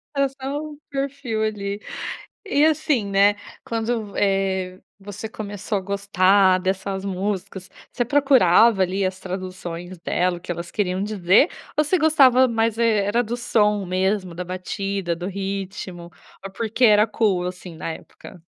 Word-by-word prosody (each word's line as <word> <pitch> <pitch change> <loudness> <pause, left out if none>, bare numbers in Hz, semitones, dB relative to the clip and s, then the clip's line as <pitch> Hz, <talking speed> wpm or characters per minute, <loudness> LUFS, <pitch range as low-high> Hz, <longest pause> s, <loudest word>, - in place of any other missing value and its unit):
Era 275 0 +2
só 270 +2 -5
um 305 -1 -8
perfil, 275 -5 -3
ali. 205 -1 -3 0.7
E 295 -4 +3
assim, 310 -7 +2
né, 200 +1 +4 0.3
quando 225 -2 -2
v, - - -7
eh, 190 -2 0 0.2
você 205 +2 -7
começou 205 -1 -4
a - - -4
gostar 195 -1 +3
dessas 190 +1 -2
músicas, 190 -1 -4 0.2
você 245 - 0
procurava, 235 -6 +5
ali, 190 +2 0
as 185 0 -2
traduções 185 -1 -6
dela, 175 +1 0
o - - -21
que 175 - -4
elas 170 +1 -7
queriam 190 -2 -1
dizer, 205 - +3 0.3
ou 300 - +4
você 365 +5 +1
gostava 265 -5 +5
mais 225 -1 0
e - - +2
era 215 0 +2
do 240 +1 -4
som 210 -4 +1
mesmo, 185 +1 -1
da 175 +2 -5
batida, 185 0 -3
do 175 +2 -5
ritmo, 195 -2 -5 0.4
ou 195 - -5
porque 230 +3 -1
era 210 -1 +6
cool, 205 -5 0
assim, 180 -1 -7
na 165 - -5
época? 175 +2 -13
200 Hz, 155 wpm, -22 LUFS, 185-230 Hz, 0.7 s, era